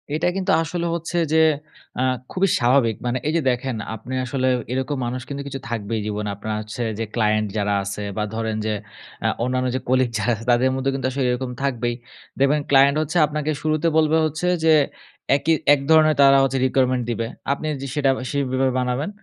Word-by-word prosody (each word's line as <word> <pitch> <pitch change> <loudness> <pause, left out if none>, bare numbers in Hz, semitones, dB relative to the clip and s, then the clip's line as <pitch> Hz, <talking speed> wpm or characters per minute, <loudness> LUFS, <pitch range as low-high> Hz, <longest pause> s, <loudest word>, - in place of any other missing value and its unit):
এটা 160 - 0
কিন্তু 190 - 0
আসলে 170 +2 -3
হচ্ছে 170 +1 -4 0.2
যে - - +4 0.6
আ - - +2 0.3
খুবই 190 0 +1
স্বাভাবিক। 120 -3 +3
মানে 120 +1 0
এই 155 - 0
যে - - +1
দেখেন 125 0 -3 0.2
আপনি 115 +4 -8
আসলে 130 +1 -1 0.2
এরকম 130 +2 -2
মানুষ 125 +1 -3
কিন্তু 140 0 -4
কিছু 135 -1 -5
থাকবেই 115 -1 -2
জীবনে। 105 0 -3
আপনার 105 +2 -4
হচ্ছে 110 +3 -5 0.2
যে 115 - -1
ক্লায়েন্ট 110 -1 +2
যারা 105 -1 0
আছে 100 +1 -5
বা, 105 - 0
ধরেন 110 -1 -2
যে 110 - 0 0.5
আ - - +4 0.2
অন্যান্য 130 0 0
যে 130 - 0
কলিগ 130 -1 +3
যারা 110 +3 0
আছে 115 +2 -10
তাদের 125 +2 +3
মধ্যেও 135 +1 -1
কিন্তু 130 -1 -1
আসলে 135 0 -1
এরকম 125 0 -3
থাকবেই। 120 -3 -1 0.4
দেখবেন 145 +2 +3
ক্লায়েন্ট 140 +1 +5
হচ্ছে 155 +3 -2
আপনাকে 150 +1 -2
শুরুতে 155 +1 0
বলবে 160 0 +3
হচ্ছে 155 +3 -2 0.2
যে, 160 -1 +5 0.6
একি 145 +4 +2 0.2
এক 140 - +2
ধরনের 155 -1 +6
তারা 135 0 +7
হচ্ছে 135 0 0
requirement 130 -1 +1
দিবে। 115 0 -2 0.2
আপনি 140 +2 -2 0.2
যে 140 - -4
সেটা 140 -2 +2 0.2
সেইভাবে 130 -2 0
বানাবেন। 125 +7 -1
130 Hz, 190 wpm, -22 LUFS, 120-145 Hz, 0.6 s, তারা